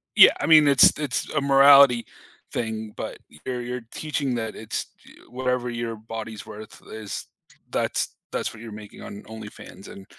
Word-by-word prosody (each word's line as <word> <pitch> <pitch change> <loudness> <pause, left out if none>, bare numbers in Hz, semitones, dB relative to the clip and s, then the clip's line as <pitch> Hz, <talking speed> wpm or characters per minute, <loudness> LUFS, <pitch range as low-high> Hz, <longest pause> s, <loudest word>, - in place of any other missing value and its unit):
yeah, - - +9
I - - -1
mean, 155 -2 +7
it's 140 -2 +7
it's 145 -5 -2
a 150 - +1
morality 140 -3 +6 0.5
thing, 110 -2 -4
but - - -6 0.3
you're 125 -1 -3
you're 120 0 -6
teaching 140 -4 -2
that 110 -2 -4
it's 110 - -4 0.2
j - - -16 0.2
whatever 125 -1 -2
your 120 -1 -4
body's 110 0 -8
worth 110 0 -11
is 110 -2 -6 0.5
that's - - -1 0.2
that's - - -3
what 110 - -13
you're 115 -1 -9
making 105 -1 -11
on 100 - -9
OnlyFans, 110 -2 -11
and 95 - -11
120 Hz, 165 wpm, -24 LUFS, 110-135 Hz, 0.5 s, yeah